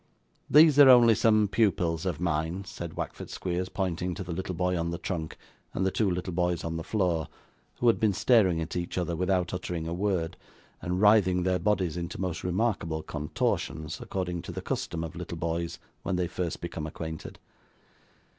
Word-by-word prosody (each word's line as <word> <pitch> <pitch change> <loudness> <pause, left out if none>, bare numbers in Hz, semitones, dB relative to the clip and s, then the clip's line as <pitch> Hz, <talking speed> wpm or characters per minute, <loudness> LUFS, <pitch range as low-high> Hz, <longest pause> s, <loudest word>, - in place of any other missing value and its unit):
'These 150 -1 +7
are 140 -2 +10
only 120 -2 +8
some 110 -1 +3
pupils 90 -5 +1
of 85 -5 -2
mine,' 85 +3 -1
said 85 -3 -7
Wackford - - -5
Squeers, 90 0 -3
pointing 90 -2 -2
to 95 - -5
the 90 - -7
little 90 +1 -3
boy 90 +1 0
on 85 -1 -1
the 85 - -3
trunk 80 -4 -4 0.4
and 95 - 0
the 95 - +2
two 105 0 +1
little 90 0 -3
boys 90 0 0
on 80 0 -3
the 80 - -4
floor, 90 -5 0 0.5
who - - -2
had 115 - +4
been 110 -2 +3
staring 105 -4 +3
at 80 +2 -5
each 90 0 -3
other 85 -1 -1
without 90 0 0
uttering 90 -2 -3
a 85 - -3
word, 90 -2 -1 0.4
and 90 +2 -2
writhing 100 -4 +5
their 90 0 +1
bodies 95 -5 0
into 85 0 -5
most 90 -2 -3
remarkable 90 -5 -1
contortions, 75 +1 -2
according 90 -2 -3
to - - -7
the - - -5
custom 85 -1 -3
of 80 +1 -6
little 85 -1 -6
boys 85 +1 -2 0.2
when 95 - -2
they 90 0 0
first 85 0 -4
become 80 -2 -5
acquainted. 80 0 -7
90 Hz, 185 wpm, -28 LUFS, 85-95 Hz, 0.5 s, are